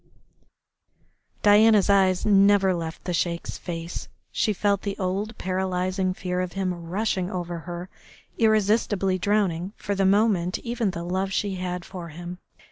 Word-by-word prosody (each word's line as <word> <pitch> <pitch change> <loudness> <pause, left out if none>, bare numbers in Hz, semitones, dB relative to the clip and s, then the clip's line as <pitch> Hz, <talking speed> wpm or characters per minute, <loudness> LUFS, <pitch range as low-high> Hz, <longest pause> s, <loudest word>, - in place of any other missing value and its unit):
Diana's 210 0 +6
eyes 190 -2 +3
never 200 -2 +5
left 165 -2 -5
the 180 - -3
Sheik's 170 0 -2
face, 170 -1 -5 0.2
she 215 - +1
felt 200 0 +1
the 200 -1 -4
old 200 +4 -2
paralysing 185 0 -1
fear 180 -1 -2
of 180 -1 -4
him 190 -2 -1
rushing 180 +2 -2
over 175 -3 -4
her, 175 +2 -7 0.5
irresistibly 210 -3 +2
drowning 195 -2 0
for 205 - -3
the 195 0 +1
moment 195 -3 +2
even 235 -3 -2
the 170 -2 -5
love 190 +2 -1
she 200 0 -1
had 180 -1 -4
for 175 -3 -8
him. 175 +3 -8
185 Hz, 140 wpm, -25 LUFS, 180-205 Hz, 0.5 s, Diana's